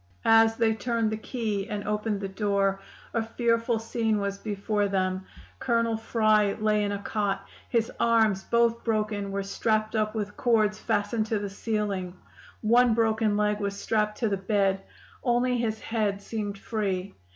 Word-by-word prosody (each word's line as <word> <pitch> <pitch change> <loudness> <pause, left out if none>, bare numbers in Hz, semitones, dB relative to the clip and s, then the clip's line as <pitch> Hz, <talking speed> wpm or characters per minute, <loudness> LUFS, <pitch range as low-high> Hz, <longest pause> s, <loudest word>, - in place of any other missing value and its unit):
"As 225 0 +6
they 225 -1 +3
turned 225 0 -1
the 215 - -2
key 215 -3 -3
and 205 -2 -4
opened 210 -1 -1
the 195 - -2
door 195 0 0 0.3
a 230 - +1
fearful 230 +1 +1
scene 225 -1 0
was 200 0 -3
before 205 0 -1
them. 185 -1 -1 0.3
Colonel 230 -2 +1
Fry 215 -2 +2
lay 215 -1 +1
in 205 - -1
a 200 - -1
cot: 200 -1 -2 0.2
his 230 -2 +1
arms, 220 -4 +3
both 235 0 +2
broken, 210 -3 -1
were 200 0 -2
strapped 215 +2 0
up 215 0 0
with 205 -1 -3
cords 215 -3 +2
fastened 215 0 0
to 220 - 0
the 200 -1 -4
ceiling; 200 -4 -2 0.5
one 235 +1 +4
broken 220 -2 +2
leg 210 0 +1
was 200 -1 -3
strapped 210 -1 0
to 230 - 0
the 200 -2 0
bed; 195 0 +1 0.4
only 245 0 +2
his 220 -2 -1
head 215 -4 -1
seemed 205 -1 -4
free. 200 -3 -2
215 Hz, 165 wpm, -27 LUFS, 200-225 Hz, 0.5 s, As